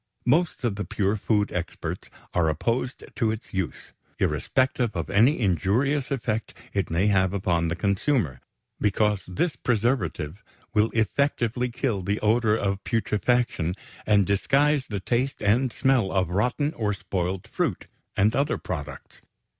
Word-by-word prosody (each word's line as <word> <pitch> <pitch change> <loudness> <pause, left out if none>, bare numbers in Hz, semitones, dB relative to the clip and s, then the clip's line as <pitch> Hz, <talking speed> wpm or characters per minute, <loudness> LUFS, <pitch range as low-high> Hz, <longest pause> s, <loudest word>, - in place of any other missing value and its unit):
Most 160 +4 +2
of 110 -5 0
the 105 - -2
pure 100 0 0
food 105 0 +1
experts 90 -1 -4 0.2
are 85 -2 +2
opposed 120 - -1
to 115 -5 +1
its 110 +1 -5
use, 95 -4 -4 0.2
irrespective 130 -4 +1
of 85 -2 -3
any 120 +9 +4
injurious 120 - +1
effect 115 -5 -2 0.2
it 100 -1 0
may 85 +4 +1
have 95 -2 +3
upon 85 -4 +1
the 85 - -1
consumer, 100 - 0 0.4
because 105 -1 +2
this 125 - -1
preservative 105 - -1 0.3
will 105 +1 +3
effectively 120 +1 +1
kill 120 -4 -1
the 100 +3 -1
odor 110 0 +3
of 100 -2 -1
putrefaction 115 -6 0 0.3
and 105 -2 +4
disguise 140 +8 +2
the 100 -2 -2
taste 125 +7 -1
and 120 +5 +2
smell 130 -7 +2
of 90 -3 0
rotten 125 - +1
or 105 -3 -1
spoiled 90 0 -3
fruit - - -2 0.3
and 105 +3 +3
other 140 +3 +1
products. 75 -6 -7
105 Hz, 140 wpm, -25 LUFS, 95-125 Hz, 0.4 s, any